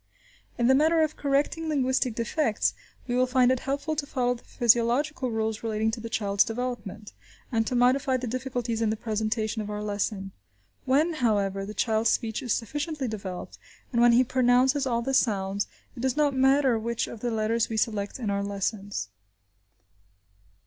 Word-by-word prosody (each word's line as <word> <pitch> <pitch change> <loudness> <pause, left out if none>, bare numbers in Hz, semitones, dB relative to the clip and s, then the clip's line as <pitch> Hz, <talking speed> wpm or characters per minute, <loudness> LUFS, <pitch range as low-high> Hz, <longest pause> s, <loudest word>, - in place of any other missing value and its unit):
In 240 - +1
the 260 - +6
matter 320 +4 +4
of 310 -1 -1
correcting 290 +3 0
linguistic 260 -4 +1
defects, 230 0 0 0.3
we 245 - -3
will 255 +1 +3
find 255 -1 +4
it 260 - +1
helpful 280 +4 -2
to 285 -1 -3
follow 245 -3 0
the 240 - -12
physiological 245 +5 +2
rules 220 -1 -2
relating 220 -1 0
to 230 - -4
the 230 0 -6
child's 200 -3 +2
development, 225 -3 -5 0.4
and 225 -2 +1
to 255 - -1
modify 255 +2 +3
the 255 - -4
difficulties 245 -2 -3
in 225 - +2
the 215 - 0
presentation 220 0 -2
of 210 - -6
our 210 0 -4
lesson. 205 -1 -2 0.5
When, 295 +6 +2
however, 200 -7 0
the 210 - -7
child's 220 +2 +1
speech 225 -3 -1
is 245 - -4
sufficiently 290 +5 -2
developed, 195 -5 -6 0.3
and 235 - +3
when 240 0 +6
he 245 +2 +6
pronounces 255 +2 +3
all 235 -2 0
the 270 +2 -2
sounds, 200 -5 +1 0.3
it - - -10
does 260 +2 -1
not 295 -2 +3
matter 265 -2 +3
which 235 +1 -2
of 230 - -9
the 240 - -2
letters 225 0 0
we 225 - -3
select 205 -2 -1
in 225 -6 -2
our 200 0 0
lessons. 200 - -3
235 Hz, 175 wpm, -27 LUFS, 215-260 Hz, 0.5 s, the